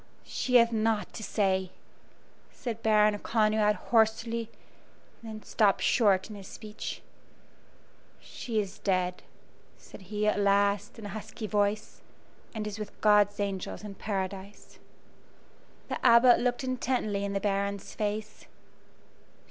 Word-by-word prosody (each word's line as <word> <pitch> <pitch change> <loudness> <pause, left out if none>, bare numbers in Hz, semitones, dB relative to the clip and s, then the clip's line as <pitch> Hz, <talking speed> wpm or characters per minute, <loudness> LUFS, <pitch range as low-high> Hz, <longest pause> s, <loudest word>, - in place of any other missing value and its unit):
"She 250 - -2
hath 235 -1 +6
naught 220 -1 0
to - - -7
say," 190 -3 0 0.8
said 230 -3 -6
Baron 210 -1 +3
Conrad, 215 -1 +2
hoarsely, 230 0 +1 0.7
and 225 - -9
then 215 -1 -8
stopped 205 -3 +2
short 195 -5 +3
in 215 - -9
his 195 -2 -10
speech. 215 -1 -7 1.2
"She 225 -3 -4
is 200 -2 -4
dead," 180 -2 0 0.6
said - - -14
he, 210 0 -1
at 210 - +2
last, 200 0 +2
in 220 - -9
a - - -5
husky 215 +2 -7
voice, 210 0 -1 0.5
"and 215 -1 -3
is 210 0 -5
with 210 -1 -8
God's 210 -1 +4
angels 200 0 -3
in 210 -1 -7
paradise." 195 0 -5 1.1
The - - -5
Abbot 240 +1 +7
looked 245 +1 0
intently 250 -5 -1
in 200 0 -2
the 195 - 0
Baron's 200 0 -2
face. 210 0 -4
210 Hz, 130 wpm, -29 LUFS, 200-220 Hz, 1.2 s, Abbot